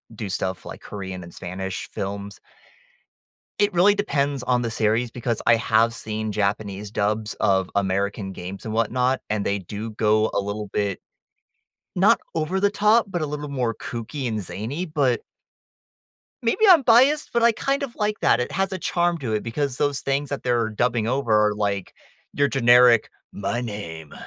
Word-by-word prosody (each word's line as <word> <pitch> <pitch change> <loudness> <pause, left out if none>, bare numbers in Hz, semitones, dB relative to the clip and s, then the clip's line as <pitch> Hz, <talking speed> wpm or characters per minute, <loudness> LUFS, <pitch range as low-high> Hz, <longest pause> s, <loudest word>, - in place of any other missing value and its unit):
do 105 -2 -5
stuff 95 0 -3
like - - -9
Korean 95 -3 -7
and 85 - -12
Spanish 95 +1 -5
films. 100 +1 -5 1.2
It 205 -2 +3
really 190 +4 +5
depends 145 -9 -1
on 125 -1 +1
the 115 -1 -2
series 110 +2 +1
because 120 -2 -3
I - - +7
have 115 +1 +2
seen 110 -1 -4
Japanese 100 0 -2
dubs 105 +1 -1
of 95 -1 +2
American 100 0 -1
games 95 +3 -8
and 110 - -3
whatnot, 125 +3 +1
and 105 -1 -1
they 100 0 0
do 105 +5 -6
go 110 0 +2
a - - +1
little 100 +1 -4
bit- 100 -2 -1 0.9
not 200 +5 +4 0.2
over 165 +4 -1
the 200 +1 +3
top- 210 +2 +3
but 175 -4 -3
a - - 0
little 150 0 -5
more 125 -5 -1
kooky 125 +4 -5
and 110 -3 -2
zany, 115 - -4
but 145 -7 +1 1.2
maybe 235 - 0
I'm 340 -7 +8
biased, 260 +6 +4
but 235 - +2
I 235 0 +6
kind 275 +5 -1
of 245 -4 -5
like 210 -1 -1
that. 120 - +3
It 125 - -3
has 195 0 -1
a 190 - -2
charm 175 -1 0
to 125 -7 -3
it 105 - 0
because 130 +3 -2
those 145 -1 0
things 140 +1 -1
that 140 - -4
they're 120 -3 +1
dubbing 115 +1 0
over 125 -2 0 0.2
are 105 - -2
like 100 -2 -2 0.4
your 145 0 +2
generic, 120 -2 +5 0.2
"My 100 +5 -2
name 85 -9 -7
115 Hz, 175 wpm, -23 LUFS, 105-150 Hz, 1.2 s, I'm